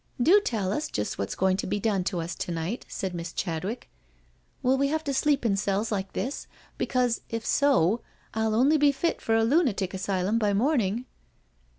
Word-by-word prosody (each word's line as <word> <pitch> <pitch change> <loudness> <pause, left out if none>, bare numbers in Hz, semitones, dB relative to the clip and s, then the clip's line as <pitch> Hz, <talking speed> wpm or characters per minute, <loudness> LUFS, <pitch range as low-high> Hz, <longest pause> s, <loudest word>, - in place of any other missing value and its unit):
" - - -34
Do 410 +3 +7
tell 200 - -1
us 300 - -2
just 105 - -3
what's 100 +1 -2
going 190 0 +2
to - - -3
be 205 - -1
done 200 -3 0
to 180 -3 -1
us 165 +2 -4
to - - -4
night," 170 +8 -3
said 190 -2 -4
Miss 170 -1 -5
Chadwick. 190 +8 -3 0.4
" - - -38
Will 255 +1 +4
we 275 +1 +2
have 315 +2 -1
to 280 - -2
sleep 280 -1 +2
in 205 -4 +3
cells 200 +2 -1
like 195 -2 -2
this, 270 +4 -3 0.3
because 250 -2 +1
if 230 0 -4
so 240 - +3 0.3
I'U 220 0 0
only 275 +7 +4
be 290 -1 +5
fit 330 +5 -1
for 225 - +1
a 225 - +3
lunatic 225 - +2
asylum 190 +3 0
by 210 -2 +1
morning?" 235 -2 +1
220 Hz, 205 wpm, -27 LUFS, 190-260 Hz, 0.4 s, Do